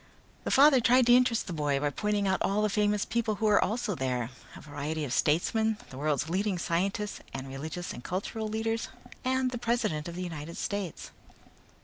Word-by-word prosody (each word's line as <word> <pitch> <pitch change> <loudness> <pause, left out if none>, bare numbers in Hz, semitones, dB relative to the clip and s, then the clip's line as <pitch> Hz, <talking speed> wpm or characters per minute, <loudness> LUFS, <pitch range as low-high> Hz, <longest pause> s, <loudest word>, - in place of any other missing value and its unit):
The - - -1
father 275 -1 +7
tried 245 +1 +5
to 240 0 +7
interest 250 -2 +3
the 180 - -5
boy 145 -3 0
by 145 0 0
pointing 210 +3 0
out 190 - +1
all 205 +2 +1
the 210 - +1
famous 210 0 +1
people 225 -2 0
who 220 - -2
were 210 -1 +5
also 220 -1 -1
there: 125 -5 -2 0.2
a - - -10
variety 150 +1 -4
of 130 - -3
statesmen 220 +10 +2
the 130 - -9
world's 150 0 0
leading 190 +3 0
scientists 195 +5 -1 0.2
and 130 - -5
religious 155 +6 -5
and 120 - -9
cultural 210 +4 -3
leaders, 225 +1 -2 0.3
the 255 -1 0
president 215 -11 0
of 170 - -6
the 180 - -4
United 165 -2 -6
States. 200 -5 -4
200 Hz, 190 wpm, -29 LUFS, 155-220 Hz, 0.3 s, father